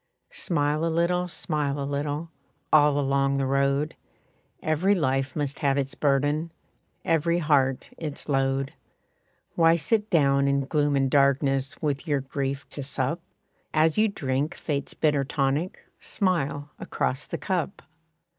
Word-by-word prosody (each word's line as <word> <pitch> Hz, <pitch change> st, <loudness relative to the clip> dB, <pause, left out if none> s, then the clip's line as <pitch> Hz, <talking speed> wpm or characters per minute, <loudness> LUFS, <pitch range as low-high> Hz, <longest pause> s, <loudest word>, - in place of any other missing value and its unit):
Smile 150 Hz, -, 0 dB
a 165 Hz, -, +1 dB
little, 175 Hz, +2 st, +1 dB
smile 150 Hz, -4 st, -2 dB
a 140 Hz, -, -2 dB
little, 145 Hz, +3 st, -3 dB, 0.4 s
All 145 Hz, -1 st, +5 dB
along 140 Hz, 0 st, +1 dB
the 135 Hz, -, 0 dB
road; 140 Hz, +2 st, +1 dB, 0.7 s
Every 170 Hz, +6 st, +2 dB
life 135 Hz, -5 st, 0 dB
must 145 Hz, -2 st, -2 dB
have 140 Hz, -1 st, +1 dB
its 135 Hz, -1 st, -1 dB
burden, 145 Hz, +3 st, +1 dB, 0.5 s
Every 165 Hz, +1 st, +2 dB
heart 140 Hz, -5 st, +1 dB
its 150 Hz, -3 st, -5 dB
load. 135 Hz, -1 st, 0 dB, 0.8 s
Why 165 Hz, -1 st, +5 dB
sit 210 Hz, +6 st, +1 dB
down 140 Hz, -4 st, +3 dB
in 140 Hz, 0 st, +1 dB
gloom 145 Hz, 0 st, +1 dB
and 135 Hz, -1 st, +2 dB
darkness, 140 Hz, -1 st, +2 dB
With 145 Hz, -1 st, -1 dB
your 145 Hz, -2 st, +1 dB
grief 135 Hz, 0 st, -3 dB
to 145 Hz, -, -6 dB
sup? 140 Hz, +4 st, -2 dB, 0.5 s
As 155 Hz, 0 st, +4 dB
you 215 Hz, +1 st, +4 dB
drink 140 Hz, -6 st, -2 dB
Fate's 140 Hz, -3 st, -3 dB
bitter 150 Hz, -3 st, +2 dB
tonic, 140 Hz, +5 st, -1 dB
Smile 150 Hz, -7 st, -1 dB
across 130 Hz, +3 st, -2 dB
the -, -, -4 dB
cup. 185 Hz, -1 st, -2 dB
145 Hz, 135 wpm, -26 LUFS, 140-160 Hz, 0.8 s, All